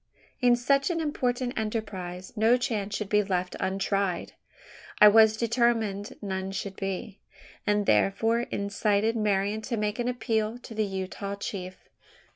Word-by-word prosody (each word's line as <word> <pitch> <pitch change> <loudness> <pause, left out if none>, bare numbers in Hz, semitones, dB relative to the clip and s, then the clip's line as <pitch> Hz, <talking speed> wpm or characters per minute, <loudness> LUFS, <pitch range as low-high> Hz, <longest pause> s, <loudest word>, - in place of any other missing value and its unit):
In 245 -2 +5
such 275 +5 +2
an 340 -2 -1
important 255 -5 -1
enterprise, 190 -5 -4
no 225 +3 +4
chance 210 -5 -2
should 210 - -3
be 210 +1 +3
left 185 -2 -2
untried. 195 -1 -1 0.7
I 210 - +10
was 220 +1 +6
determined 230 -3 0
none 190 -1 -3
should 195 0 -4
be; 195 +2 -5 0.5
and 210 0 +2
therefore 195 - +2
incited 205 +2 0
Marian 210 -1 0
to 235 +1 -3
make 210 +1 -1
an 240 - 0
appeal 225 -2 -1
to 245 -1 -11
the 215 -1 0
Utah 195 +1 -4
chief. 185 -2 -7
210 Hz, 140 wpm, -27 LUFS, 195-230 Hz, 0.7 s, I